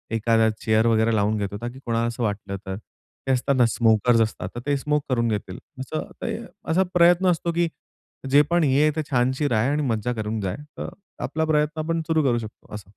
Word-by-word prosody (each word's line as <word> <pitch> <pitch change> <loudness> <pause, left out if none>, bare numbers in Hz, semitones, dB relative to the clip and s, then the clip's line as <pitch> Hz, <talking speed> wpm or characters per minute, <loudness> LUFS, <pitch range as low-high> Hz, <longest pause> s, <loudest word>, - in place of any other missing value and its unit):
एखादा 115 0 +3
चेअर 110 0 +2
वगैरे 110 0 +3
लावून 105 +1 +1
घेतो, 100 0 -3
ताकी 120 +2 -6
कोणाला 115 0 0
असं 120 0 -3
वाटलं 100 -2 -3
तर. 95 - -4 0.5
ते - - +2
असतात 130 +2 +1
ना 125 -2 +5
स्मोकर्स 115 0 +3
असतात, 110 -4 -2
तर - - -3
ते 145 - +1
स्मोक 150 +1 0
करून 120 -2 +1
घेतील. 105 -4 -3 0.2
असं 145 +4 -5
ते - - -2 0.4
असा 185 +3 +4
प्रयत्न 175 +1 +5
असतो, 170 0 -1
की 170 0 +1 0.6
जे 145 - +7
पण 175 -1 +3
हे 140 0 +3
आहे 155 - +4
तर 160 - 0
छानशी 130 +3 +1
राय 120 -1 +1
आणि 150 +1 0
मज्जा 120 -1 -1
करून 110 -1 -3
जाय. 95 -2 -2 0.2
तर - - -4 0.3
आपला 160 0 -1
प्रयत्न 150 0 +1
आपण 165 +1 -1
सुरू 160 -2 +2
करू 120 -3 +2
शकतो 110 -1 -11
असं. 100 -3 -10
120 Hz, 210 wpm, -24 LUFS, 110-150 Hz, 0.6 s, जे